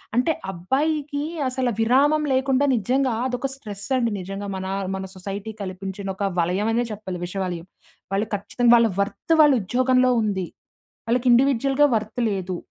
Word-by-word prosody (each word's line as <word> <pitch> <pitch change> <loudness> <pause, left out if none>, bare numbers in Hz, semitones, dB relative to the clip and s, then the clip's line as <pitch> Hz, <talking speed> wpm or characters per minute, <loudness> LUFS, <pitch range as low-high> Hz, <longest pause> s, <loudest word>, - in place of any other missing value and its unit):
అంటే 250 +6 +3 0.2
అబ్బాయికి 285 - -1 0.3
అసల 255 -1 -1
విరామం 275 +7 +4
లేకుండా 265 +1 +2
నిజంగా 255 +4 +1
అదొక 250 +1 -2
స్ట్రెస్ 205 -6 -8
అండి 235 -2 +1
నిజంగా 195 +2 -6
మన, 190 0 -4 0.3
మన 190 0 -4
సొసైటీ 195 +3 -6
కల్పించిన 195 +1 -5
ఒక 200 - -2
వలయం 185 +6 +1
అనే 240 +1 +2
చెప్పాలి 195 -4 -6
విషవలయం. 180 -2 -4 0.5
వాళ్ళు 205 +3 0
ఖచ్చితంగా 235 +4 +2
వాళ్ళ 230 -1 +4
వర్త్ 210 - -1
వాళ్ళ 295 -2 +6
ఉద్యోగంలో 255 +4 +3
ఉంది. 190 -4 -1 0.6
వాళ్ళకి 245 +2 +2
ఇండివిడ్యుయల్‌గ 270 +2 +3
వర్త్ 215 +2 -3
లేదు. 185 -2 -3
225 Hz, 140 wpm, -23 LUFS, 195-260 Hz, 0.6 s, వాళ్ళ